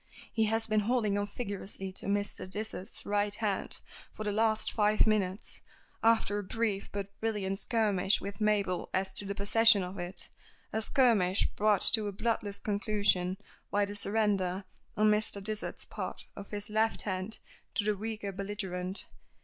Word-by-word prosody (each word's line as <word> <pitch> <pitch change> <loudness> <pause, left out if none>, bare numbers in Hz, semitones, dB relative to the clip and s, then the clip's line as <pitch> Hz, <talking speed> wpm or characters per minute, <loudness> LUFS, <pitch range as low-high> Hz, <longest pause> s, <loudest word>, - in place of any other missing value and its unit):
He 220 -2 +3
has 225 +1 +1
been 215 -1 +2
holding 215 -1 +1
on 205 0 0
vigorously 200 -3 -5
to - - -7
Mr. 205 -1 -1
Dysart's 210 0 -5
right 205 0 +1
hand 210 -3 -1 0.3
for 215 - -5
the 210 - -1
last 220 +1 +2
five 210 -1 +3
minutes, 205 -2 0 0.4
after 225 -2 +3
a - - -4
brief 205 0 -1
but 200 0 -5
brilliant 200 -3 -1
skirmish 205 -4 +2
with 200 +2 -7
Mabel 205 -4 +1
as 190 0 -1
to 200 - -3
the 200 0 -3
possession 210 +1 +6
of 180 +1 -6
it 175 +1 -5 0.4
a 220 - 0
skirmish 220 -7 +3
brought 210 -1 +3
to 215 -2 +2
a - - -2
bloodless 210 -1 -1
conclusion 200 -3 +1 0.3
by 205 0 +2
the 205 0 -7
surrender, 200 -3 +1 0.3
on 215 0 +5
Mr. 210 -1 +1
Dysart's 215 +2 0
part, - - -6
of 200 - -9
his 205 0 -5
left 220 +1 +2
hand 190 +2 -2 0.4
to - - +1
the 210 0 +1
weaker 215 0 -4
belligerent. 195 -1 0
205 Hz, 160 wpm, -31 LUFS, 195-215 Hz, 0.4 s, possession